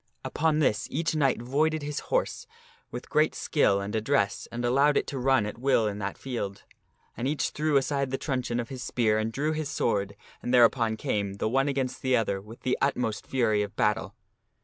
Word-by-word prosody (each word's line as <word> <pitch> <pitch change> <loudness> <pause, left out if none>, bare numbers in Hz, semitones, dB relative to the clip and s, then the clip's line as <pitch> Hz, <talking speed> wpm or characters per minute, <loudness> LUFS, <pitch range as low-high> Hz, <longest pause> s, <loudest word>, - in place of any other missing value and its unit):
Upon 155 0 +1
this 130 -7 +1
each 160 +3 -1
knight 135 -6 +1
voided 155 +4 +1
his 145 0 -3
horse - - -1 0.4
with - - -7
great 155 +1 +2
skill 100 -10 +2
and 100 +2 -4
address, 110 -1 0
and 120 +1 -3
allowed 140 +4 +4
it - - +1
to 135 - -5
run 130 -3 +3
at 105 +2 -6
will 130 -3 +3
in 105 -1 -2
that 100 -1 -4
field. 100 -7 -5 0.5
And 125 - -2
each 145 +1 0
threw 150 -1 +1
aside 140 0 0
the 135 - -1
truncheon 125 -4 -2
of 120 - -4
his 130 -2 -6
spear 110 -4 +1
and 110 +1 -1
drew 145 +6 -1
his 155 -2 -3
sword, 100 -3 -1 0.3
and 120 - -3
thereupon 115 -2 +4
came, 100 -2 -1
the 100 - -1
one 135 +5 +2
against 135 -2 -2
the 130 -1 +3
other, 100 -3 -1
with 110 +4 -13
the 130 - 0
utmost 125 -6 -1
fury 110 -5 +2
of 105 0 -4
battle. 105 -3 0
125 Hz, 200 wpm, -27 LUFS, 110-140 Hz, 0.5 s, allowed